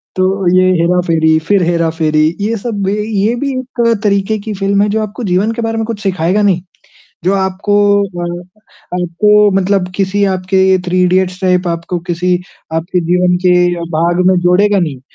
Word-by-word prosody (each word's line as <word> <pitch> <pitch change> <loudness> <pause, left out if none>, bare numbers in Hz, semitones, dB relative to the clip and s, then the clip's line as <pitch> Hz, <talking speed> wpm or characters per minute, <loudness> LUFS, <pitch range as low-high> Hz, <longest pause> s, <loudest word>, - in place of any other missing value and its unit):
तो 185 0 +1 0.3
ये 185 0 +4
हेरा-फेरी, 165 -2 +2
फिर 200 -3 +3
हेरा-फेरी, 160 -2 +1
ये 220 +3 -1
सब 205 -1 -4
भी 195 - 0 0.3
ये 235 +2 +1
भी 275 -1 -1
एक 255 -1 -5 0.2
तरीक़े 200 +1 +1
की 215 +1 -6
फ़िल्म 200 +1 0
हैं 210 - 0
जो 220 0 0
आपको 215 +3 -6
जीवन 190 +4 +1
के 235 - -4
बारे 225 0 -2
में 225 - -1
कुछ 225 -2 -5
सिखाएगा 190 +1 0
नहीं, 185 -4 +2 0.6
जो 190 - +2
आपको 190 +1 -1 0.3
अ, 175 -2 -5 0.6
आपको 210 +4 +3
मतलब 190 -1 0
किसी 200 +1 0
आपके 190 0 +2
थ्री 180 +1 0
इडियट्स 185 0 +1
टाइप 180 -1 +1
आपको 170 +1 -3
किसी 180 +1 0 0.4
आपके 175 +3 -1
जीवन 180 0 +2
के 180 - +5 0.2
अ, 170 - -6 0.2
भाग 175 +2 +1
में 185 - +4
जोड़ेगा 195 +3 +3
नहीं, 150 -7 -3
185 Hz, 175 wpm, -13 LUFS, 175-205 Hz, 0.6 s, के